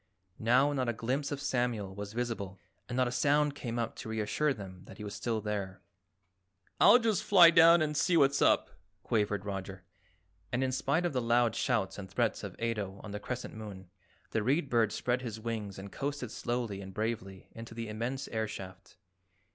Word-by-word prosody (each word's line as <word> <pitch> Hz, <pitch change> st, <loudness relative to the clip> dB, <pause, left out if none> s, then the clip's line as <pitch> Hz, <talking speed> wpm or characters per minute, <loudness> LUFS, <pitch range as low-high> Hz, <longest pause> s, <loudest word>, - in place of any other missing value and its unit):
Now 130 Hz, +6 st, +4 dB
not 130 Hz, -3 st, 0 dB
a -, -, 0 dB
glimpse 130 Hz, +6 st, -2 dB
of 145 Hz, -, -3 dB
Samuel 120 Hz, -8 st, -1 dB
was 100 Hz, +1 st, -7 dB
visible 115 Hz, -5 st, -3 dB, 0.3 s
and 120 Hz, -, -3 dB
not 130 Hz, -1 st, +3 dB
a -, -, -2 dB
sound 145 Hz, +3 st, +2 dB
came 120 Hz, -4 st, -5 dB
up 115 Hz, -1 st, -2 dB
to -, -, -7 dB
reassure 110 Hz, +7 st, 0 dB
them 95 Hz, -7 st, -7 dB
that -, -, -12 dB
he 105 Hz, -, -7 dB
was 105 Hz, -, -6 dB
still 115 Hz, -2 st, -2 dB
there. 100 Hz, -3 st, -4 dB, 1.0 s
"I'll 235 Hz, -, +8 dB
just 220 Hz, -4 st, +1 dB
fly 180 Hz, -6 st, +8 dB
down 165 Hz, 0 st, +7 dB
and 150 Hz, -1 st, -2 dB
see 170 Hz, +3 st, +3 dB
what's 140 Hz, -2 st, +4 dB
up," -, -, +3 dB, 0.3 s
quavered 105 Hz, -3 st, 0 dB
Roger, 95 Hz, -2 st, -5 dB, 0.7 s
and 125 Hz, +2 st, 0 dB
in 130 Hz, -, 0 dB
spite 140 Hz, +6 st, 0 dB
of 175 Hz, -, -1 dB
the 125 Hz, -, 0 dB
loud 120 Hz, -1 st, +2 dB
shouts 105 Hz, -7 st, 0 dB
and 95 Hz, -1 st, -8 dB
threats 110 Hz, +4 st, 0 dB
of 100 Hz, -3 st, -6 dB
Ato 105 Hz, -4 st, -2 dB
on 105 Hz, -, -7 dB
the 105 Hz, -, -4 dB
Crescent 125 Hz, +4 st, -5 dB
Moon, 100 Hz, -4 st, -9 dB, 0.4 s
the 110 Hz, -, +1 dB
Read 140 Hz, +6 st, +1 dB
Bird 115 Hz, -3 st, +3 dB
spread 125 Hz, +3 st, -1 dB
his 115 Hz, -3 st, -5 dB
wings 110 Hz, -3 st, -4 dB
and 95 Hz, +1 st, -8 dB
coasted 140 Hz, -4 st, -4 dB
slowly 120 Hz, -5 st, -3 dB
and 95 Hz, -1 st, -10 dB
bravely 105 Hz, -4 st, -4 dB
into 115 Hz, 0 st, -10 dB
the 115 Hz, -1 st, -4 dB
immense 120 Hz, +5 st, -3 dB
air 110 Hz, -1 st, -1 dB
shaft. 95 Hz, -2 st, -9 dB
115 Hz, 195 wpm, -31 LUFS, 105-130 Hz, 1.0 s, I'll